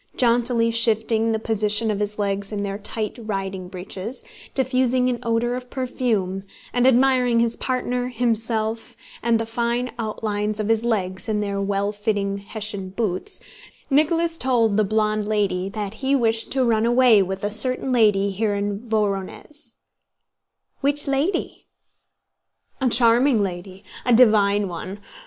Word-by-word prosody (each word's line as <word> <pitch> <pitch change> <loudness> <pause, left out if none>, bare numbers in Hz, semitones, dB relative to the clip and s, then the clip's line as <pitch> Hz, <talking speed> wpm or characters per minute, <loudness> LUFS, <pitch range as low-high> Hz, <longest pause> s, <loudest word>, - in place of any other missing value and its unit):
Jauntily 235 -1 +2
shifting 225 0 +2
the 220 - +1
position 215 0 +1
of 205 - -2
his 210 0 -1
legs 200 -1 -1
in 205 -1 -3
their 200 0 -4
tight 215 +2 -3
riding 195 -3 -4
breeches, 190 +5 -6 0.3
diffusing 255 -1 +2
an 245 -1 -2
odor 235 0 0
of 250 0 -7
perfume, 230 -8 -2 0.3
and 245 +1 +3
admiring 250 -2 +4
his 235 0 +1
partner, 250 -1 -2
himself, 225 -2 -2 0.2
and 235 0 +2
the 225 - -2
fine 235 +2 -1
outlines 215 -1 -2
of 215 0 -2
his 225 0 +2
legs 190 -4 -2
in 210 -1 0
their 200 -1 -2
well 200 +1 0
fitting 205 -2 -2
Hessian 200 -1 -5
boots, 195 - -2 0.5
Nicholas 330 +3 +2
told 235 -6 +2
the 215 - +3
blonde 215 0 0
lady 195 -3 0
that 205 -1 -5
he 270 +4 0
wished 225 -3 +1
to 265 -1 +2
run 225 -1 +2
away 240 -3 +5
with 190 +1 -3
a 205 - -1
certain 255 +4 +2
lady 205 -5 +3
here 205 +1 -1
in 200 0 -2
Vorónezh. 215 +8 -3 1.0
"Which 285 +1 0
lady?" 290 +7 -1 1.1
"A 260 - +3
charming 235 0 +4
lady, 185 +1 -6 0.2
a 245 - +2
divine 210 -4 +4
one. 185 +2 -6
220 Hz, 145 wpm, -22 LUFS, 205-245 Hz, 1.1 s, away